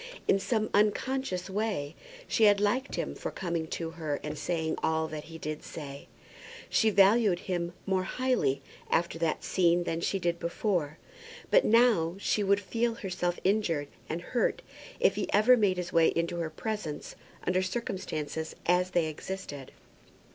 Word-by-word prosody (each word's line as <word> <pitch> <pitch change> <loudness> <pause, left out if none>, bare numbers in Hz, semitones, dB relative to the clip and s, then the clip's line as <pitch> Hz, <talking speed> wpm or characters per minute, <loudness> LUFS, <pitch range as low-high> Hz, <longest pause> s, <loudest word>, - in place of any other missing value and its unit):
In 195 - +4
some 215 +1 -1
unconscious 210 -1 +1
way 195 -7 -2 0.3
she 225 - +3
had 205 -1 +6
liked 240 +7 0
him - - -2
for - - -5
coming 170 -3 -3
to 165 0 -4
her 155 -3 -3
and 150 - -4
saying 160 -2 -1
all 160 0 +1
that 155 -1 -6
he 165 0 -9
did 155 -1 -5
say. 140 -3 -8 0.6
She 220 - +4
valued 200 -1 +4
him 175 -2 -2
more 190 -1 +1
highly 170 - 0 0.3
after 170 -1 +1
that 165 -2 0
scene 175 -1 +3
than 165 -1 -2
she 195 - 0
did 170 -2 -1
before. 170 -3 -1 0.5
But - - +6
now, 220 -8 +4
she 205 +1 0
would 200 +1 +3
feel 230 +3 -1
herself 180 -4 -2
injured 180 -7 +1 0.2
and 165 +2 -2
hurt 240 +6 0 0.4
if - - +4
he - - -3
ever 215 +5 +6
made 200 -6 +2
his 180 -1 -4
way 165 -1 +5
into 170 +1 0
her 165 -2 -2
presence 185 -3 -5 0.3
under 185 +1 +2
circumstances 170 -6 -3
as 180 +1 +3
they 175 -3 +2
existed. 155 -3 -6
180 Hz, 160 wpm, -29 LUFS, 160-210 Hz, 0.6 s, had